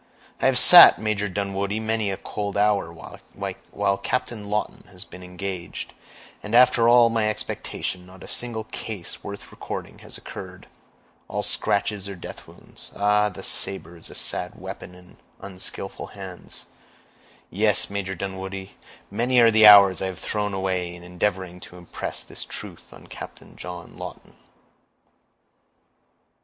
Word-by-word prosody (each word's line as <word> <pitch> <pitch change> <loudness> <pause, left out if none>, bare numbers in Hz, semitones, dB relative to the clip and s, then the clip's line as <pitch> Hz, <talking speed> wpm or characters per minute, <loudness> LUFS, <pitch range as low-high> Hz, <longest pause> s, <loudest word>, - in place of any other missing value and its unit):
I - - +4
have 130 -1 +4
sat, 175 +6 +11
Major 105 -2 -1
Dunwoodie, 100 +2 -2
many 110 -1 -1
a 95 - -3
cold 100 -1 -4
hour, 100 -4 +2
while 100 +3 -4
Captain 110 -1 -3
Lawton 105 +1 -3
has - - -11
been 90 - -12
engaged, 90 -1 -6 0.5
and 105 +2 -3
after 120 -1 +6
all 120 -1 +6
my 110 -2 +1
expectation, 95 -3 -4
not 95 0 -14
a - - -10
single 115 -2 -3
case 105 -4 -6
worth 100 0 -8
recording - - -7
has - - -6
occurred—all - - -10
scratches 100 -1 0
or 100 - -6
death 85 - -10
wounds. - - -9
Ah! 105 +1 +3
the 95 - -10
saber 90 -3 0
is 85 - -10
a - - -11
sad - - -2
weapon 90 - -8
in 90 0 -17 0.2
unskillful 95 0 -7
hands! 95 -3 -9 0.9
Yes, 105 +1 +2
Major 95 -1 -3
Dunwoodie, 95 +1 -6 0.4
many 120 +4 +2
are 115 -1 +7
the 110 -1 +7
hours 100 -2 +8
I 95 - -1
have 95 -2 -6
thrown 105 0 -2
away 95 -2 -2
in 90 - -13
endeavoring 90 0 -2
to 90 - -12
impress 90 -1 -6
this - - -8
truth - - -9
on - - -14
Captain - - -11
John 90 -2 -9
Lawton." - - -9
100 Hz, 145 wpm, -24 LUFS, 95-105 Hz, 0.9 s, sat